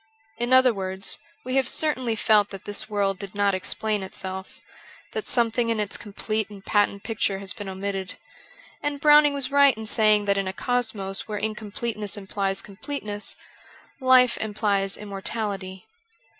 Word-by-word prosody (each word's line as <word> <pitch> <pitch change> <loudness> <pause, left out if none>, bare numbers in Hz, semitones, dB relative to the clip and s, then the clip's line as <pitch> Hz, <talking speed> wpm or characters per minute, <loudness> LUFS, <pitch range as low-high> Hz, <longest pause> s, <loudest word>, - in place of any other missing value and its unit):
In 240 +1 -1
other 260 -1 +6
words, 190 -1 0 0.3
we 255 +1 0
have 265 -3 +3
certainly 260 -6 +1
felt 210 -1 +4
that 195 -1 -9
this 205 +2 -3
world 200 -2 0
did 200 -1 -7
not 200 -1 +2
explain 210 +3 -1
itself, 190 0 -7 0.5
that 435 - -4
some 235 -2 +2
thing 235 0 0
in 225 -1 0
its 210 -1 -2
complete 215 0 -3
and 200 -1 -12
patent 205 -1 +1
picture 210 -3 -1
has 195 -1 -3
been 205 -3 -7
omitted. 190 0 -4 0.6
And 290 -1 -2
Browning 295 0 +6
was 280 -1 -2
right 280 -3 +5
in 220 - -6
saying 215 -1 +3
that 200 -1 +2
in 195 - -2
a 190 - -3
cosmos 210 -5 -1
where 210 -1 -3
incompleteness 215 0 -3
implies 195 -1 -2
com 200 -2 -13
pleteness, 210 -7 -3 0.6
life 255 -2 +5
implies 205 -2 0
immortality. 200 -1 -5
210 Hz, 160 wpm, -25 LUFS, 195-235 Hz, 0.6 s, other